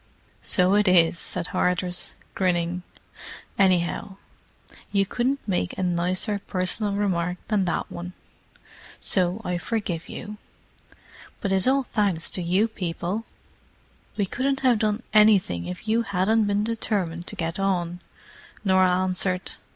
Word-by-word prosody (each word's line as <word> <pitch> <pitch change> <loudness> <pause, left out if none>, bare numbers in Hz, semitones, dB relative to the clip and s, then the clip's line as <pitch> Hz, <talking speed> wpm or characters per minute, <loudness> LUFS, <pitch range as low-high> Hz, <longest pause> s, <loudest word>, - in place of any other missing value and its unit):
"So 180 +1 +3
it 210 0 +3
is," 170 -2 +4
said 180 -1 -2
Hardress, 180 0 +1 0.2
grinning. 180 -1 0 0.8
"Anyhow, 185 +1 +1 0.8
you 195 -1 +2
couldn't 250 +7 -1
make 180 - -1
a - - -1
nicer 180 +4 0
personal 195 +3 +1
remark 180 -3 0
than 205 -4 +2
that 175 - -2
one. 175 +1 -7 0.9
So 185 +2 +2
I 180 -1 -1
forgive 185 -6 -3
you. 210 -1 -7 1.0
But 200 - -2
it's 190 +3 +2
all 270 +1 +3
thanks 200 -9 0
to 185 - 0
you 185 +6 +2
people." 185 +1 -4 0.9
"We 205 - +1
couldn't 270 +7 -1
have 250 -4 +3
done 215 +2 0
anything 200 - +4
if 90 - -7
you 225 +2 +2
hadn't 210 +1 +1
been 205 0 +1
determined 200 -7 -2
to - - -2
get 165 +2 -3
on," 180 -3 -1 0.7
Norah 185 -1 +4
answered. 185 0 0
185 Hz, 130 wpm, -25 LUFS, 180-210 Hz, 1.0 s, is